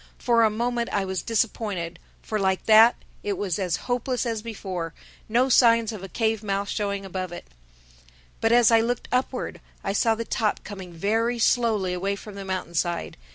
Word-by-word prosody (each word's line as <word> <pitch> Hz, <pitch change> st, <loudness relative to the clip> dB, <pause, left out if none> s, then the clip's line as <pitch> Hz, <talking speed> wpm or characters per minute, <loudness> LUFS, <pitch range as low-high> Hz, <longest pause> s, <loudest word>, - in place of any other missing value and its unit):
For 235 Hz, -2 st, +3 dB
a 220 Hz, -, +5 dB
moment 235 Hz, +2 st, -1 dB
I 200 Hz, -2 st, 0 dB
was 190 Hz, -2 st, -2 dB
disappointed, 205 Hz, -6 st, -2 dB, 0.2 s
for 215 Hz, -, -2 dB
like 190 Hz, -1 st, 0 dB
that, 225 Hz, +2 st, +7 dB, 0.3 s
it 200 Hz, -2 st, -2 dB
was 195 Hz, -2 st, -2 dB
as 180 Hz, -3 st, 0 dB
hopeless 250 Hz, +1 st, -1 dB
as 225 Hz, -2 st, -2 dB
before—no 215 Hz, +3 st, -3 dB
signs 230 Hz, -3 st, +5 dB
of 215 Hz, -4 st, -7 dB
a 195 Hz, -, -8 dB
cave 220 Hz, 0 st, 0 dB
mouth 200 Hz, -1 st, -2 dB
showing 200 Hz, -2 st, -2 dB
above 185 Hz, -1 st, -4 dB
it. 175 Hz, -, -8 dB, 0.9 s
But 225 Hz, -, +2 dB
as 240 Hz, -1 st, +6 dB
I 225 Hz, 0 st, +6 dB
looked 240 Hz, +2 st, -2 dB
upward, 250 Hz, +1 st, -1 dB, 0.2 s
I 195 Hz, -, -1 dB
saw 225 Hz, +2 st, +3 dB
the 230 Hz, +1 st, -4 dB
top 215 Hz, -2 st, -1 dB
coming 190 Hz, -3 st, -8 dB
very 225 Hz, +7 st, 0 dB
slowly 220 Hz, -5 st, +2 dB
away 195 Hz, +3 st, -1 dB
from 210 Hz, +1 st, -10 dB
the 200 Hz, 0 st, -7 dB
mountainside. 175 Hz, -2 st, -2 dB
210 Hz, 175 wpm, -25 LUFS, 190-230 Hz, 0.9 s, that